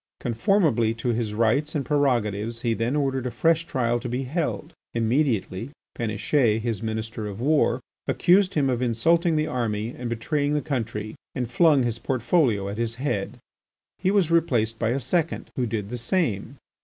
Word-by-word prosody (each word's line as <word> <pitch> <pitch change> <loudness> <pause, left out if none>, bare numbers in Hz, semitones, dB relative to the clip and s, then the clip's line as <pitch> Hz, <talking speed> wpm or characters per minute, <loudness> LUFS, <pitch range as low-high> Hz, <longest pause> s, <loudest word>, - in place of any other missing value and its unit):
Conformably 120 - +2
to 115 +2 -3
his 115 -2 -1
rights 130 +8 +1
and 140 -3 -1
prerogatives 115 -6 0
he 115 -2 +2
then 115 +5 -1
ordered 135 -3 0
a - - -1
fresh 165 +7 +2
trial 120 -5 0
to 120 +1 -5
be 125 +3 -2
held. 155 +3 -3 0.2
Immediately, 115 -3 0 0.3
Péniche, 115 +1 +1
his 115 -2 -2
Minister 110 -1 -4
of 100 0 -7
War, 135 -2 +2 0.3
accused 185 +2 +3
him 145 -3 +2
of 125 -2 0
insulting 165 +8 +2
the 155 0 +1
army 110 -5 -2
and 125 -1 -5
betraying 145 +5 0
the 150 - +1
country 115 -7 -3 0.2
and 125 -2 -3
flung 150 -1 +4
his 120 -1 -2
portfolio 120 - +1
at 100 +3 -5
his 115 -1 -1
head. 120 -6 -2 0.6
He 185 - +1
was 195 -5 +2
replaced 115 -9 +2
by 115 - +1
a 130 +4 0
second, 165 +6 -1
who 125 -2 0
did 105 -3 -3
the 125 +1 -4
same. 120 - -1
120 Hz, 170 wpm, -25 LUFS, 115-150 Hz, 0.6 s, flung